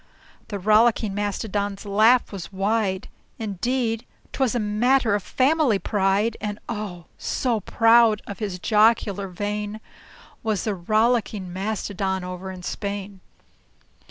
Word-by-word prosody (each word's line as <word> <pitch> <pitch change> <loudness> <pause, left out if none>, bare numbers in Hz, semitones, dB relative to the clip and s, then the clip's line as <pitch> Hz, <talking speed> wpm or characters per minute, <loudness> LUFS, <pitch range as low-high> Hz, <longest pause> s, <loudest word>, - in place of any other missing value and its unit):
The 205 - -4
Rollicking 215 +1 +3
Mastodon's 205 0 -2
laugh 220 +5 +4
was 195 -3 -7
wide 195 -1 0 0.3
Indeed, 225 +2 -1 0.3
't - - -8
was 255 -2 +2
a - - +1
matter 225 +3 +2
of 205 - +1
family 265 - +2
pride; 200 +2 +1
And 210 -1 -3
oh! 205 -7 -5
so 240 -4 0
proud 225 +1 +4
of 200 - -8
his 200 -4 -3
jocular 210 -1 +2
vein 205 +3 -4 0.6
Was 215 -4 -1
the 215 - -1
Rollicking 215 0 0
Mastodon 190 -1 -2
over 180 +1 -6
in 185 -1 -8
Spain. 200 0 -5
210 Hz, 125 wpm, -24 LUFS, 195-225 Hz, 0.6 s, laugh